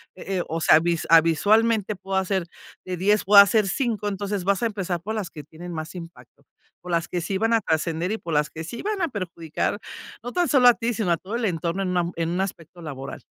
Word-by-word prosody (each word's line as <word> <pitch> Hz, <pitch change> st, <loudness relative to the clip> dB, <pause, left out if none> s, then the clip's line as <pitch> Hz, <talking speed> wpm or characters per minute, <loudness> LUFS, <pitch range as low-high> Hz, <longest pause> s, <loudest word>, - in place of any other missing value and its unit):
Eh 190 Hz, +1 st, -4 dB
eh, -, -, -1 dB
o 165 Hz, -, -3 dB
sea, 155 Hz, -, +6 dB
visua 170 Hz, 0 st, -1 dB
ah, -, -, +6 dB
visualmente 215 Hz, +6 st, +2 dB
puedo 190 Hz, 0 st, -4 dB
hacer 190 Hz, -1 st, 0 dB, 0.4 s
de 185 Hz, -1 st, -4 dB
10, 205 Hz, +4 st, +2 dB
o 205 Hz, +2 st, +3 dB
a 200 Hz, -, +13 dB
hacer 200 Hz, +1 st, +3 dB
5 215 Hz, 0 st, -1 dB
Entonces, 200 Hz, -1 st, -3 dB
vas 200 Hz, +3 st, +1 dB
a -, -, +3 dB
empezar, 190 Hz, -5 st, -3 dB
por 215 Hz, +5 st, -4 dB
las 205 Hz, -5 st, -3 dB
que 150 Hz, -, -9 dB
tienen 175 Hz, +3 st, -10 dB
más 160 Hz, +2 st, -6 dB
impacto, 170 Hz, -1 st, -12 dB, 0.4 s
por 180 Hz, -, -8 dB
las 170 Hz, 0 st, 0 dB
que 180 Hz, -, -2 dB
sí 190 Hz, +4 st, -2 dB
van 225 Hz, +2 st, +2 dB
a 225 Hz, -, +3 dB
trascender, 165 Hz, +1 st, -1 dB
y 220 Hz, -, -1 dB
por 165 Hz, -, -5 dB
las 150 Hz, 0 st, +2 dB
que 160 Hz, -, -7 dB
sí 230 Hz, +9 st, -7 dB
van 415 Hz, -1 st, -2 dB
a 340 Hz, -, +2 dB
perjudicar. 185 Hz, -, -3 dB, 0.4 s
No 245 Hz, -, -5 dB
tan 355 Hz, -1 st, +1 dB
solo 260 Hz, -4 st, +5 dB
a 245 Hz, -, +9 dB
ti, 235 Hz, +1 st, -2 dB
sino, 210 Hz, -4 st, -2 dB
a 170 Hz, -, +3 dB
todo 195 Hz, +7 st, -6 dB
el 235 Hz, -1 st, -1 dB
entorno, 170 Hz, 0 st, -2 dB
en 185 Hz, -, -2 dB
un 180 Hz, -, 0 dB
am 175 Hz, 0 st, 0 dB
en 165 Hz, 0 st, -1 dB
un 180 Hz, +2 st, -1 dB
aspecto 175 Hz, -2 st, -6 dB
laboral. 135 Hz, -4 st, -7 dB
185 Hz, 255 wpm, -24 LUFS, 165-210 Hz, 0.4 s, a